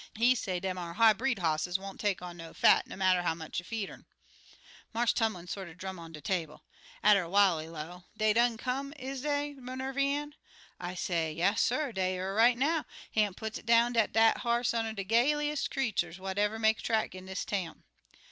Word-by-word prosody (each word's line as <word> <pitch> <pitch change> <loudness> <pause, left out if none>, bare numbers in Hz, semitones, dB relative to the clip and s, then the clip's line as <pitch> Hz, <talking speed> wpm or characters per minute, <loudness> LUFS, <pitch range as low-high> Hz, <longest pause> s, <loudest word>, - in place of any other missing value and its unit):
He 240 +3 +5
say 185 -7 -2
dem 185 0 -3
ar 170 -1 -5
high 225 -1 +6
bred 250 +2 -1
hosses 165 0 0
won't 195 0 -9
take 200 -4 -1
on 175 -1 -7
no 165 -1 -10
fat, - - +5
no - - -8
matter 185 -1 +3
how 170 -2 0
much 160 0 -5
you 175 - -10
feed 220 -2 -3
urn.' - - -13 0.9
"Marse 235 0 +2
Tumlin 215 -6 -1
sorter 175 -2 -6
drum 190 0 -6
on 165 -1 -10
de 155 - -9
table. 160 -1 -3 0.4
Atter 200 -5 +5
while 195 -3 +4
he 155 - -6
low, 165 +3 -8
'Dey 215 0 +3
done 235 0 +3
come, 270 +4 -3
is 265 -1 -5
dey, 290 0 -1
Minervy 265 +2 -2
Ann?' 290 +1 -2 0.5
I 175 +1 -5
say, 165 -3 -1
'Yasser, 225 - +1
dey 185 -1 0
er 185 +1 -3
here - - -3
right 235 +3 +5
now. 310 +5 +1 0.3
Hamp 210 -3 +1
puts 220 0 -5
it - - -19
down 235 +1 +4
dat 225 -2 +2
dat 225 0 +4
ar 235 0 0
hoss 240 - +2
oneer 225 -1 -1
de 200 - -3
gayliest 295 +8 +1
creatur's 195 -10 -1
what 190 +1 -4
ever 210 +1 +1
make 220 0 +2
a - - -7
track 220 -1 0
in 185 0 -10
dis 190 +1 -4
town.' 185 -6 -4
210 Hz, 215 wpm, -30 LUFS, 180-240 Hz, 0.9 s, high